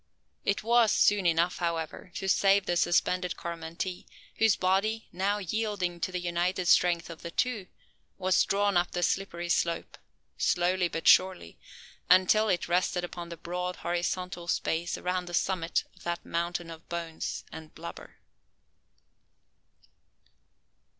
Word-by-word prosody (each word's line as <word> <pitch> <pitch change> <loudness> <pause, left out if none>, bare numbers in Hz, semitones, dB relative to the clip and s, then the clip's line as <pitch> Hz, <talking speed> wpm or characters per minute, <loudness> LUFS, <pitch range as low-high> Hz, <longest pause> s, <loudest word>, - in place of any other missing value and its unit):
It 200 - 0
was 230 -1 +4
soon 200 -3 +3
enough, 170 +2 +2
however, 170 0 -3
to 195 - -3
save 195 +1 +4
the 175 - 0
suspended 175 +1 +1
Coromantee; 170 +2 -5 0.3
whose 225 -3 +4
body, 200 +4 0
now 195 +3 0
yielding 205 -3 -2
to 185 - -2
the 180 - -2
united 175 +1 -1
strength 175 -1 +3
of 165 - -10
the 170 - -6
two, 220 0 -1 0.5
was 185 -1 +3
drawn 200 -1 +1
up 175 0 +2
the 175 - -1
slippery 175 -2 -1
slope, 170 0 -1 0.4
slowly, 180 +1 +2
but 165 -1 -4
surely, 185 - +4 0.5
until 185 +4 +5
it 180 -3 0
rested 180 0 +1
upon 175 -1 -6
the 170 - -7
broad 180 +2 -4
horizontal 175 0 -3
space 170 0 -1
around 180 0 -2
the 175 - -3
summit 170 -2 0
of - - -20
that 175 0 -4
mountain 170 0 -2
of 165 0 -12
bones 170 -2 -4
and 160 -1 -10
blubber. 170 +1 -9
180 Hz, 135 wpm, -29 LUFS, 170-190 Hz, 0.5 s, until